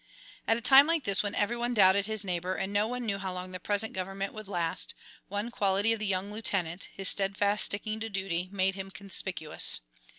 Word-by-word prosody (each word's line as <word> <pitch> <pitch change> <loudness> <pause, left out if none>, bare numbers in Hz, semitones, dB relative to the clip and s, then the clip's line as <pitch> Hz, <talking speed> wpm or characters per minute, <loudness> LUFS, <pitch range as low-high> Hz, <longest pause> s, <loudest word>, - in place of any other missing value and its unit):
At 225 - +3
a - - -6
time 275 +4 +7
like 330 -3 0
this 200 -3 +1
when 205 -1 -3
every 210 +3 0
one 240 +1 -2
doubted 195 0 +5
his 220 -1 -2
neighbor, 180 -1 -2
and 195 +1 -3
no 205 +1 +2
one 250 +1 -4
knew 200 -3 -2
how 190 -1 -4
long 180 0 -5
the 185 - -6
present 205 +4 -1
government 195 +1 -4
would 215 -2 -8
last, 170 -4 -2 0.3
one 205 +4 -4
quality 200 0 +1
of 225 - -4
the 215 - -2
young 195 +1 -1
lieutenant, 190 -5 -2
his 195 -1 0
steadfast 200 +1 +2
sticking 215 +1 0
to 225 +1 -4
duty, 185 -3 -3
made 190 -1 +1
him 195 0 -7
conspicuous. 190 - +2
200 Hz, 210 wpm, -29 LUFS, 190-215 Hz, 0.3 s, time